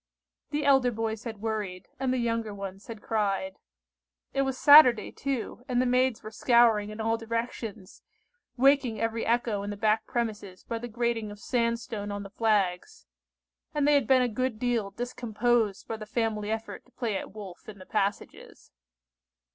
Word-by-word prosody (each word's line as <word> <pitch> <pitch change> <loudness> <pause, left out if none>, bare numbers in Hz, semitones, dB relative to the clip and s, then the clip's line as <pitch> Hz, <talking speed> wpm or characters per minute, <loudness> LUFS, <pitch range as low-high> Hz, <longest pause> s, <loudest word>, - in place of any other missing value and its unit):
The 295 0 -2
elder 270 -3 +5
boys 225 -1 -3
had 220 -3 -7
worried, 210 -5 -3
and 265 -1 0
the 255 - +1
younger 230 -3 -1
ones 195 0 -8
had 225 -3 -9
cried. 195 -3 -1 0.8
It 275 - +1
was 265 -1 -1
Saturday 285 -6 +7
too, 260 -3 -4
and 250 -2 +1
the 255 - +2
maids 250 -1 +1
were 215 - -7
scouring 225 -3 +4
in 215 +1 -8
all 225 +1 +1
directions, 225 -3 -5 0.6
waking 265 -3 +3
every 230 0 -1
echo 230 -3 +1
in 200 - -5
the 205 - -5
back 215 +1 +1
premises 210 -6 -4
by 230 - -4
the 240 - -6
grating 235 -1 -1
of 205 - -9
sand 235 +1 0
stone 205 -1 -5
on 205 0 -4
the 200 - -10
flags; 195 - 0 0.7
and 290 -1 +2
they 295 - +5
had 280 -6 +3
been 260 -1 +5
a - - +2
good 245 0 -2
deal 235 -3 0
discomposed 235 -1 -1
by 225 - -4
the 215 -1 -9
family 220 -2 -1
effort 220 0 -4
to 250 - -26
play 230 -5 -2
at 190 - -6
"Wolf" 200 -2 -10
in 205 - -10
the 185 - -12
passages. 205 0 -3
225 Hz, 180 wpm, -28 LUFS, 210-245 Hz, 0.8 s, Saturday